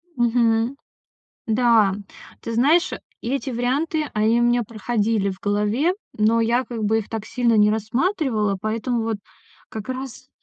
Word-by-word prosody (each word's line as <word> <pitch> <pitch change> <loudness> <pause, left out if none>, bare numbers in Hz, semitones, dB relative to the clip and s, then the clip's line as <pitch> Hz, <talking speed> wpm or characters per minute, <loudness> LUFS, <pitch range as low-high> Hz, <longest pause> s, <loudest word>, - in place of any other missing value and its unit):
Мгм. 235 0 +2 0.7
Да, 225 -4 +4 0.5
ты 230 - -5
знаешь, 300 +10 +3 0.3
эти 265 +3 -2
варианты, 275 +6 0
они 220 +2 +2
у - - +3
меня 240 0 +3
проходили 215 -1 -1
в 185 - -7
голове, 210 - +1 0.2
но 225 +2 +2
я 235 +3 +2
как 230 -3 -5
бы 220 +2 +2
их 210 - -8
так 220 -2 -4
сильно 235 0 +1
не 210 0 +5
рассматривала, 220 - 0
поэтому 225 +2 -1
вот 225 -2 -2 0.5
как 220 +2 -7
раз 255 0 -6
230 Hz, 145 wpm, -22 LUFS, 215-250 Hz, 0.7 s, не